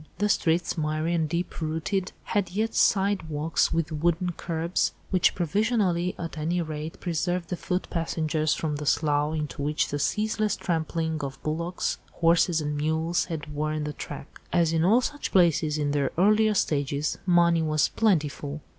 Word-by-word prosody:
The 210 0 +1
streets, 170 -2 +1
miry 155 +2 -1
and 160 -3 0
deep 170 +1 -3
rutted, 165 +5 -1
had 200 -5 -1
yet 215 +5 -1
side 195 -4 +2
walks 155 +2 +1
with 165 -1 -1
wooden 170 +3 0
curbs, 170 +1 -1 0.2
which 185 -3 +3
provisionally, 185 -1 +1
at 165 -2 -6
any 170 +4 0
rate, 155 -1 -5
preserved 175 +1 -2
the 180 - -1
foot 180 +1 -2
passengers 160 -2 0
from 150 -2 -2
the 150 0 -5
slough 150 0 +2
into 150 -1 -4
which 150 +2 0
the 145 - -2
ceaseless 215 +4 0
trampling 160 -1 -2
of 135 0 -5
bullocks, 170 +3 -2
horses 165 0 +3
and 150 0 -2
mules 160 +3 0
had 155 -3 -6
worn 155 +1 -1
the 150 0 -3
track. 145 -1 -9
As 170 -2 +2
in 165 0 +2
all 220 +8 +5
such 290 +3 -4
places 165 -4 +3
in 145 -1 0
their 145 -1 0
earlier 215 +3 +4
stages, 145 -3 0
money 170 -1 +4
was 155 -1 +2
plentiful. 150 -7 0
165 Hz, 165 wpm, -26 LUFS, 155-180 Hz, 0.2 s, all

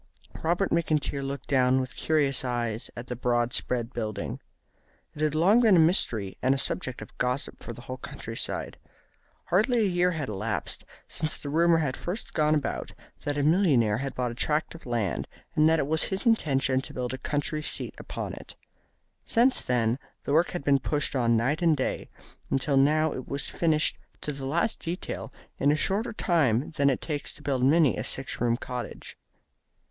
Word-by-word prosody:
Robert 175 +4 +1
McIntyre 155 -4 0
looked 140 +1 -5
down 130 -1 +3
with 130 0 -4
curious 145 -4 +2
eyes 120 -3 -2
at 120 - -5
the 125 - -4
broad 120 0 0
spread 120 -1 0
building. 110 -3 -4 0.7
It 150 - -8
had 155 -1 +1
long 190 +9 +5
been 220 -5 +6
a - - +6
mystery 120 - +2
and 130 +1 +3
a - - -2
subject 130 -1 -3
of - - -15
gossip 125 +2 -1
for - - -7
the 120 - -9
whole 130 +1 -6
country 115 -2 -8
side. - - -2 0.7
Hardly 225 +7 +3
a 210 - +3
year 180 -1 +2
had 150 -5 -3
elapsed 105 +1 -3 0.2
since 155 -1 -2
the 145 - -5
rumour 165 +2 +4
had 150 -5 0
first 185 +6 -5
gone 155 0 +3
about 150 - -2 0.3
that 145 0 -1
a 145 - +1
millionaire 140 - +3
had 135 0 -4
bought 125 -1 -1
a - - -6
tract 150 +5 +1
of 165 -5 -12
land, 115 -6 -1 0.3
and 155 0 +5
that 160 0 +4
it 145 - +1
was 160 +2 +1
his 190 +5 -3
intention 135 - +2
to - - -8
build 125 0 -3
a 130 - -5
country 145 +2 -2
seat - - -2
upon - - -5
it. - - -10 0.7
Since 250 +2 +3
then 120 0 +1 0.2
the 140 - -1
work 165 +3 +4
had 175 -6 -5
been 140 -1 +4
pushed 145 +2 -1
on 115 -3 +3
night 135 +8 0
and 165 -3 +4
day, 130 - -2 0.4
until 135 +1 +1
now 150 +3 +3
it 130 - -6
was 140 0 -2
finished 155 -2 +1 0.2
to 150 - -3
the 140 -2 -6
last 170 +10 0
detail 170 +1 -5 0.3
in 145 - +4
a - - +3
shorter 200 +8 0
time 145 - +1
than 140 -3 +2
it 130 - 0
takes 145 -3 -3
to 150 - -12
build 135 -3 0
many 150 +1 +5
a - - -2
six 135 - -3
roomed 120 +1 +1
cottage. 125 -1 -6
140 Hz, 195 wpm, -27 LUFS, 125-160 Hz, 0.7 s, been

